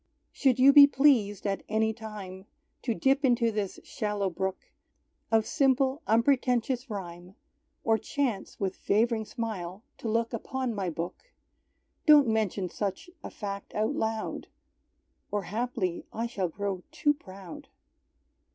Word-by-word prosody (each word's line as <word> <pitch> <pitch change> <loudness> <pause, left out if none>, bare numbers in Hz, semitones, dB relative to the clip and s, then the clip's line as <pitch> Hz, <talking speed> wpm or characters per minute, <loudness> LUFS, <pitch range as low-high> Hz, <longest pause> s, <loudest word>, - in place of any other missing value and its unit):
Should 265 -4 +2
You 270 +2 +7
be 285 -1 +10
pleased, 255 -9 +3
at 195 -1 -1
any 220 0 +1
time, 205 -4 -9 0.3
To 235 -4 -1
dip 275 +2 +2
into 240 -3 +3
this 210 -3 -3
shallow 205 -3 -2
brook 190 +2 -4 0.6
Of 220 -1 +4
simple, 270 0 +2
unpretentious 250 +1 +2
rhyme, 180 -2 -7 0.5
Or 225 -1 +3
chance 250 -9 -2
with 195 -1 -1
fav'ring 220 +1 +1
smile 210 -5 -5 0.2
to 225 - -3
look 230 +2 0
Upon 255 +1 -3
my 195 -4 -2
book; 175 - -6 0.8
Don't 295 -3 +8
mention 215 -4 0
such 200 - -4
a - - -5
fact 200 -1 -6
out 215 +1 +1
loud, 220 0 -3 0.8
Or 205 -1 -1
haply 215 -2 -3
I 230 +2 -2
shall 200 -7 -2
grow 195 +1 -3
too 295 - +2
proud! 200 +4 -11
220 Hz, 135 wpm, -28 LUFS, 195-255 Hz, 0.8 s, be